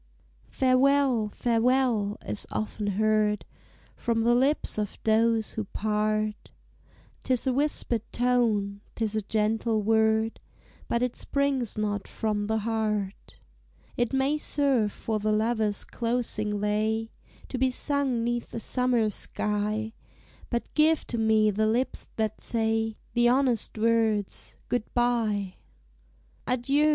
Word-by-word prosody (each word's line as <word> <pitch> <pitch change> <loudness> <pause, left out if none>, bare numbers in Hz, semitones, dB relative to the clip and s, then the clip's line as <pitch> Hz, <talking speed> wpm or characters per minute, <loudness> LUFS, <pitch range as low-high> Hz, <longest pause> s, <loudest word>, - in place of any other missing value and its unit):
"Farewell! 260 -3 +3
farewell!" 230 -2 +1
is 210 - -2
often 210 -1 -3
heard 215 -1 +2 0.5
From 230 -1 0
the 240 +1 +4
lips 265 -1 +2
of 210 -2 -3
those 225 0 +2
who 220 - -3
part: 215 +1 -1 0.7
'Tis 255 -1 0
a 260 - +2
whispered 270 -4 0
tone, 225 -5 +1
'tis 220 -2 -1
a 215 - +1
gentle 215 +1 0
word, 220 +1 +2 0.5
But 235 +1 0
it 250 -1 -1
springs 275 -6 -1
not 205 -1 -2
from 210 -2 -2
the 220 +1 +1
heart. 215 -3 -2 0.6
It 240 -1 0
may 270 +3 +1
serve 270 -9 +1
for 220 +1 -3
the 215 +1 0
lover's 215 -1 +1
closing 230 -3 -2
lay, 220 +2 0 0.4
To 255 - -3
be 260 0 +3
sung 265 -2 -1
'neath 240 0 -2
a - - -2
summer 245 -1 +1
sky; 210 +2 -2 0.6
But 235 -1 -3
give 315 +1 +3
to 235 - 0
me 220 -1 +4
the 215 +2 +1
lips 240 +4 -1
that 220 -1 -2
say 225 -1 0 0.2
The 240 0 +4
honest 250 -4 +1
words, 220 -2 0
"Good 245 -3 -2
bye!" 220 -6 0 0.9
"Adieu! 275 +5 +2
225 Hz, 125 wpm, -27 LUFS, 215-245 Hz, 0.9 s, the